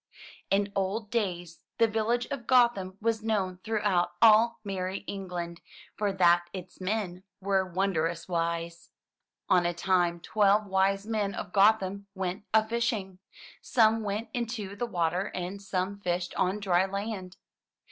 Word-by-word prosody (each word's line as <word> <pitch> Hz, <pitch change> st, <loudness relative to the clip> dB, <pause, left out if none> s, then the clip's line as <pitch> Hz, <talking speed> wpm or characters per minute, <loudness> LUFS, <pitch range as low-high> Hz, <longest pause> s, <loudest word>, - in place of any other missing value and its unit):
In 200 Hz, +1 st, +1 dB
old 200 Hz, +3 st, -2 dB
days 175 Hz, -7 st, -2 dB, 0.2 s
the 230 Hz, -, +5 dB
village 225 Hz, +2 st, 0 dB
of 260 Hz, -5 st, -5 dB
Gotham 235 Hz, -7 st, +3 dB
was 225 Hz, 0 st, 0 dB
known 195 Hz, -5 st, -1 dB
throughout 205 Hz, -5 st, +1 dB
all 225 Hz, +1 st, +6 dB
merry 190 Hz, -1 st, -3 dB
England, 180 Hz, -4 st, -6 dB, 0.3 s
for 205 Hz, -1 st, 0 dB
that 175 Hz, -2 st, +4 dB
its 185 Hz, -1 st, -9 dB
men 185 Hz, -2 st, -2 dB, 0.2 s
were 190 Hz, -1 st, 0 dB
wondrous 170 Hz, -3 st, -1 dB
wise. 170 Hz, -1 st, -3 dB, 0.6 s
On 180 Hz, -, +4 dB
a 175 Hz, 0 st, -1 dB
time, 175 Hz, -1 st, +1 dB
twelve 210 Hz, +3 st, +2 dB
wise 195 Hz, +1 st, +1 dB
men 210 Hz, -3 st, -1 dB
of 180 Hz, -, -6 dB
Gotham 200 Hz, -1 st, +3 dB
went 190 Hz, +1 st, -3 dB
a 220 Hz, 0 st, +4 dB
fishing. 220 Hz, -5 st, -2 dB, 0.4 s
Some 225 Hz, -2 st, +3 dB
went 210 Hz, +2 st, -3 dB
into 230 Hz, -5 st, -3 dB
the 240 Hz, +4 st, -3 dB
water 175 Hz, 0 st, 0 dB
and 185 Hz, +2 st, -4 dB
some 195 Hz, 0 st, -2 dB
fished 175 Hz, -2 st, -2 dB
on 190 Hz, +2 st, 0 dB
dry 190 Hz, -2 st, +2 dB
land. 195 Hz, -2 st, -5 dB
195 Hz, 140 wpm, -29 LUFS, 180-215 Hz, 0.6 s, all